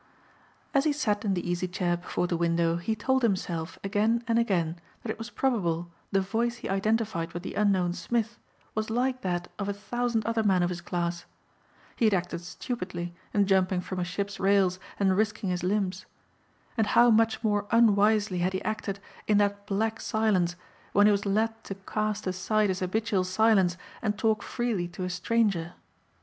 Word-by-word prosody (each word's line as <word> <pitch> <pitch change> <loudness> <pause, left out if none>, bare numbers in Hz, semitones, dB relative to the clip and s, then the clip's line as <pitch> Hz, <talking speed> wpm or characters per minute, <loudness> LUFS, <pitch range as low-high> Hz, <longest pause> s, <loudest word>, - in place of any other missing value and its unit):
As 275 +1 +3
he 305 - +3
sat 210 -8 0
in 200 -3 +1
the 175 - -3
easy 175 +1 -1
chair 180 -1 0
before 175 0 -2
the 175 - -1
window 170 0 +1
he 195 +6 -1
told 260 +5 +1
himself 180 -7 -1
again 215 +4 +1
and 230 0 +3
again 175 -7 0 0.2
that 220 - -2
it - - -7
was 225 +1 -6
probable 175 -12 0 0.2
the 195 - +3
voice 230 +5 -1
he 240 - -7
identified 200 -3 0
with 175 +1 -5
the - - -5
unknown 190 -4 +2
Smith 230 +4 -2 0.3
was 215 0 -2
like 255 +3 0
that 175 -1 -2
of 200 0 -2
a - - 0
thousand 235 +2 -1
other 230 0 +1
men 190 -4 +3
of 175 - 0
his 175 -1 -5
class. 170 0 -2 0.7
He 230 - +2
had 215 -2 +4
acted 175 -1 -2
stupidly 180 -3 -5 0.2
in 205 -1 +3
jumping 190 -1 +2
from 185 +1 -5
a - - 0
ship's 200 +3 -4
rails 195 -2 +3 0.2
and 190 -2 +3
risking 205 -2 0
his 180 0 -1
limbs. 190 0 -1 0.7
And 220 -3 +1
how 240 0 +6
much 225 +1 +3
more 205 -2 +1
unwisely 210 -3 +4
had 180 +2 0
he 190 - -2
acted 215 -2 -3 0.3
in 210 - +4
that 205 0 +1
black 220 +2 0
silence 195 -6 +1 0.4
when 205 - +6
he 210 - +6
was 205 0 0
led 225 +3 0
to 195 - -5
cast 215 +2 -2
aside 200 +3 +1
his 185 0 -1
habitual 195 +1 0
silence 190 -2 +3 0.2
and 210 -3 -1
talk 220 -1 +1
freely 230 -8 -2
to 175 +1 -7
a 180 - -2
stranger. 180 -2 0
200 Hz, 185 wpm, -28 LUFS, 180-220 Hz, 0.7 s, how